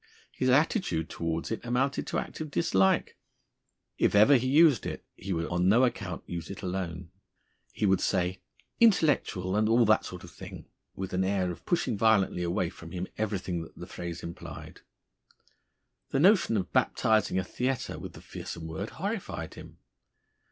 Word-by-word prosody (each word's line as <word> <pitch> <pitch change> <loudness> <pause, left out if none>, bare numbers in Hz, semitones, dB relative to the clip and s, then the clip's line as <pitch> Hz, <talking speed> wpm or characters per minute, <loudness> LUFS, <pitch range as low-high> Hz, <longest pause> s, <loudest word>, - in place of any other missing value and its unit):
His 130 - 0
attitude 135 - +2
towards 85 +2 -3
it 115 - -3
amounted 130 +3 0
to - - -2
active 155 -1 -4
dislike. 95 -8 +2 0.8
If - - +3
ever 110 +8 +7
he 130 0 +2
used 150 0 +5
it, - - -6
he 95 +2 -6
would 85 -2 0
on 90 +2 +1
no 115 +6 +5
account 95 -8 -2
use 85 -2 -6
it 100 +1 -8
alone; 90 -2 -4 0.6
he - - -1
would 95 -1 +3
say, 90 +1 0 0.4
"Intellectual, 145 - +3
and 110 +1 +2
all 115 +1 +5
that 110 -1 +4
sort 90 +1 -8
of 85 - -11
thing!" - - -10 0.3
with 95 -1 -5
an 95 +1 +1
air 95 -2 0
of 85 - -11
pushing 125 - 0
violently 105 -5 +3
away 85 0 -1
from 85 -3 -11
him 90 +1 -4
everything 95 -5 -2
that 80 - -11
the - - -7
phrase 85 -1 -6
implied. 85 - -9 1.3
The 135 - 0
notion 180 - +5
of 90 -3 -3
baptising 110 -3 +2
a 95 - +1
theatre 125 +7 -2
with - - -8
the - - -12
fearsome 85 - -7
word 80 0 -5
horrified - - -4
him. - - -12
95 Hz, 165 wpm, -29 LUFS, 90-120 Hz, 1.3 s, ever